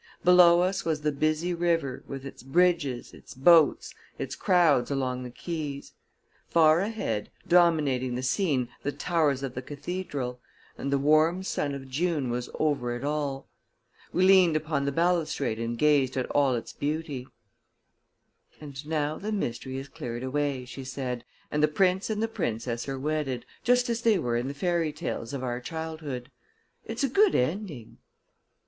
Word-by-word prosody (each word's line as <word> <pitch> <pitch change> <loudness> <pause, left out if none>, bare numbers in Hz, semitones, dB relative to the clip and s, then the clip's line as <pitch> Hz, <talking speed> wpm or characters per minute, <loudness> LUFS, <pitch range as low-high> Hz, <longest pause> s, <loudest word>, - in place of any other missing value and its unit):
Below 175 -1 +7
us 185 +1 0
was 155 -2 -1
the 150 0 +1
busy 155 +4 0
river, 170 -6 0
with 135 0 -7
its 135 - -9
bridges, 150 -2 +1
its - - -13
boats, 160 +3 +5 0.2
its - - -4
crowds 170 - +3
along 130 -2 -1
the 125 - -6
quays; 145 0 -5 0.6
far 160 -1 +5
ahead, 195 - -2 0.2
dominating 150 -8 +3
the 125 - -3
scene, 130 - +1
the 145 - -2
towers 150 -5 0
of 135 -2 -4
the 125 - -4
cathedral; 145 -3 -5 0.4
and 140 - -4
the 140 - +3
warm 155 +6 +3
sun 145 -6 -2
of 135 -1 -8
June 145 -2 -1
was 120 0 -3
over 135 -6 0
it 120 - -6
all. 145 -2 -2 0.6
We 185 - +2
leaned 185 -4 +6
upon 155 -2 -1
the 140 - 0
balustrade 160 -7 0
and 115 0 -3
gazed 140 -2 +3
at 130 - 0
all 140 -3 +3
this 115 - -5
beauty. 145 -3 -3 1.3
"And 140 -2 -8
now 155 -1 -1
the 210 +2 -4
mystery 130 - -3
is 135 +1 -6
cleared 125 -6 -6
away," 140 -1 -1
she 135 +2 -8
said, 130 -2 -4 0.3
"and 150 - 0
the 150 - +5
prince 185 +6 +1
and 215 0 -1
the - - +1
princess 120 - -3
are 135 - -3
wedded, 135 -3 -2 0.2
just 245 +1 +3
as 235 -1 -1
they 225 -3 +4
were 120 -8 -1
in 120 +2 -1
the 140 - -5
fairy 170 0 0
tales 120 -5 -4
of 140 -2 -4
our 120 -1 -2
childhood. 155 -3 -6 0.5
It's 230 +4 -3
a - - +4
good 390 - +4
ending." 150 - -2
145 Hz, 165 wpm, -27 LUFS, 130-170 Hz, 1.3 s, Below